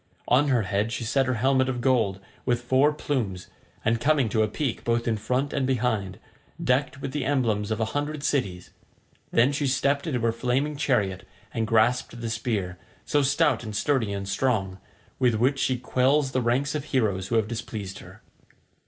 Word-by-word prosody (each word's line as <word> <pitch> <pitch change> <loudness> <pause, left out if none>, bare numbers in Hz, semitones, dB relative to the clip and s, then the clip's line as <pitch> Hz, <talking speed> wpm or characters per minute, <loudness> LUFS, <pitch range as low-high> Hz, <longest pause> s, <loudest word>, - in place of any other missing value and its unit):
On 140 +4 +4
her 125 -5 +2
head 100 +3 -1
she 120 - -3
set 130 +4 +1
her 130 - +1
helmet 130 +2 +2
of 125 -2 -2
gold, 120 -6 +1 0.2
with 120 -1 0
four 130 +4 +4
plumes, 115 -12 -3 0.4
and 115 +1 +1
coming 140 -3 +3
to 110 +2 +1
a 110 - +3
peak 130 +3 -3
both 115 0 0
in 115 - +2
front 125 +6 -1
and 135 -3 0
behind—decked 125 +3 -2
with 135 - -4
the 145 0 -2
emblems 115 -7 0
of 110 0 -1
a 110 - +1
hundred 145 0 -2
cities; 100 -12 -1 0.6
then 120 +4 +4
she 145 0 -1
stepped 140 +3 +1
into 130 -6 -1
her 115 0 +2
flaming 130 +6 -1
chariot 115 -10 0 0.3
and 110 -1 -1
grasped 120 +2 +2
the 115 -1 -3
spear, 105 -6 -2 0.3
so 145 - +2
stout 140 -3 +2
and 110 -2 -6
sturdy 125 -2 +1
and 100 -1 -4
strong, 100 -4 0 0.4
with 125 -3 +3
which 130 +5 +1
she 130 -1 +1
quells 130 +3 +2
the 130 - 0
ranks 130 +4 +1
of 150 -2 -3
heroes 105 -10 0
who 115 - -1
have 110 -2 +2
displeased 110 -4 -5
her. - - -14
125 Hz, 185 wpm, -26 LUFS, 110-135 Hz, 0.6 s, On